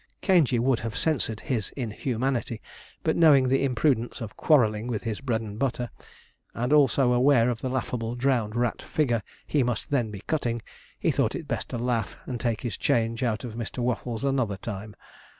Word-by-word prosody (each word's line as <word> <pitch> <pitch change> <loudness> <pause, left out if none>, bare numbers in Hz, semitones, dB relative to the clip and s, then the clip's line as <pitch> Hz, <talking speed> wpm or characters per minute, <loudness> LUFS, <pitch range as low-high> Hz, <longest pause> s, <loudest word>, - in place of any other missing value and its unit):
Caingey 165 - +4
would 120 0 +2
have 115 0 -4
censured 120 -9 0
his 115 -6 -2
inhumanity, 120 0 -2 0.4
but - - +1
knowing 140 -6 +6
the 135 +1 +2
imprudence 125 -2 +1
of 110 -5 -7
quarrelling 110 -7 +3
with 110 -4 -2
his 110 0 -3
bread 120 -5 0
and 105 -1 -7
butter, 125 -3 -1 0.6
and 120 +5 0
also 135 -3 +4
aware 125 -1 +4
of 115 - -4
the 130 - -2
laughable, 120 -2 -2
drowned 120 -4 +1
rat 120 -1 0
figure 120 -7 0 0.2
he 145 - +1
must 120 0 -2
then 125 -6 +1
be 100 -2 -8
cutting, 120 -3 -1 0.4
he - - +2
thought - - +1
it - - -6
best - - -3
to - - -3
laugh, 115 -3 -1
and 125 -2 -4
take 115 -3 -1
his 120 -7 -3
change 115 +1 +1
out 110 -5 0
of 120 -3 -6
Mr. 115 +1 -5
Waffles 120 -1 -2
another 130 -8 0
time. 105 +1 -6
120 Hz, 185 wpm, -26 LUFS, 115-130 Hz, 0.6 s, knowing